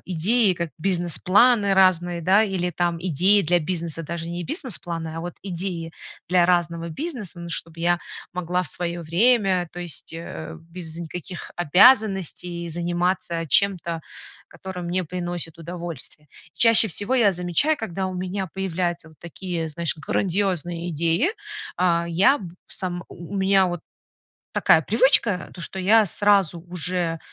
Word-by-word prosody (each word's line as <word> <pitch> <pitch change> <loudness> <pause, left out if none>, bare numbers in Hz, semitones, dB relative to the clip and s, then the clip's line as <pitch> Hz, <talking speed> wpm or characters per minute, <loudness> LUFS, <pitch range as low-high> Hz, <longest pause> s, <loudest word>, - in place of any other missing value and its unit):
идеи, 195 +5 +2
как 170 -2 -4
бизнес-планы 195 +5 +3
разные, 175 -2 +3
да, 190 +5 +5
или 185 -3 -1
там 175 -1 -1
идеи 185 +4 +3
для 175 +1 +3
бизнеса, 165 -1 -3
даже 170 +1 -5
не 175 0 -4
бизнес-планы, 175 - -4
а - - -3
вот 175 +1 -5
идеи 175 -3 -4 0.4
для 180 -1 +4
разного 170 -1 +1
бизнеса, 235 - -6
ну 170 - -7
чтобы 165 0 -5
я 175 0 +2 0.3
могла 180 0 -1
в - - -10
своё 175 +3 -4
время, 190 +1 +3
то 175 - -7
есть, 170 -4 -6
э, 165 -1 -7
без 165 -1 -8
никаких 175 +1 -7
обязанностей 180 - +3
заниматься 175 0 -1
чем-то, 170 -1 +1 0.5
которое 190 -1 -8
мне 175 +2 -1
приносит 175 -1 -5
удовольствие. 165 -3 -7 0.3
Чаще 230 -1 +6
всего 205 +8 -1
я 225 -6 +4
замечаю, 180 - +1
когда 190 -3 -3
у 185 - -5
меня 185 +2 -3
появляются 175 -3 -2
вот 155 - -20
такие, 170 -1 -5
знаешь, 165 +2 -2
грандиозные 175 0 -1
идеи, 170 - +1 0.5
а, 170 -2 +2
я 195 - +4
б 175 -4 -9 0.2
сам 175 -2 -4
у 175 +2 -10
у - - -1
меня 195 0 +4
вот 175 -2 -3 0.7
такая 160 - +5
привычка, 225 - +3
то, 180 - -9
что 190 - -5
я 215 +4 +5
сразу 200 -3 +2
уже, 175 -1 -1
175 Hz, 145 wpm, -23 LUFS, 170-190 Hz, 0.7 s, Чаще